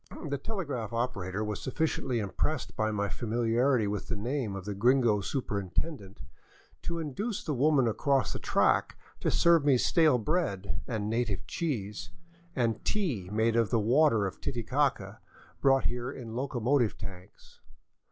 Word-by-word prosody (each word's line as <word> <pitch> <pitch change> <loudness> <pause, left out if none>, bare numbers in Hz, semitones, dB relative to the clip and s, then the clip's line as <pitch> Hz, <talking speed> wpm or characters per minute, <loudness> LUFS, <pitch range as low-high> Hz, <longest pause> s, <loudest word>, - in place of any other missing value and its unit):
The 140 -2 -2
telegraph 140 - -4
operator 105 -4 -2
was 105 -1 -3
sufficiently 135 -2 -1
impressed 115 +7 -2
by 110 0 +1
my 105 -1 -1
familiarity 120 +3 +1
with 100 -1 -3
the 115 - -2
name 115 -1 -2
of 95 -1 -7
the 105 - -3
gringo 115 0 +3
superintendent 100 - -3 0.6
to 170 - -3
induce 175 - -3
the 155 - -2
woman 135 -1 +3
across 135 +4 +1
the - - -4
track - - +2 0.2
to - - 0
serve 170 -3 +4
me 140 -3 +4
stale 155 +1 +4
bread 105 - -1
and 105 -2 -2
native 110 -7 -1
cheese, 105 - -3 0.5
and 115 -4 0
tea 140 - -1
made 110 +2 +2
of 115 -2 +3
the 115 - +2
water 115 -1 +4
of 95 - -5
Titicaca, 120 -4 -1 0.4
brought 135 -1 +4
here 125 +1 -2
in 120 -5 -8
locomotive 125 -1 +1
tanks. 95 -1 -11
120 Hz, 145 wpm, -30 LUFS, 105-140 Hz, 0.6 s, serve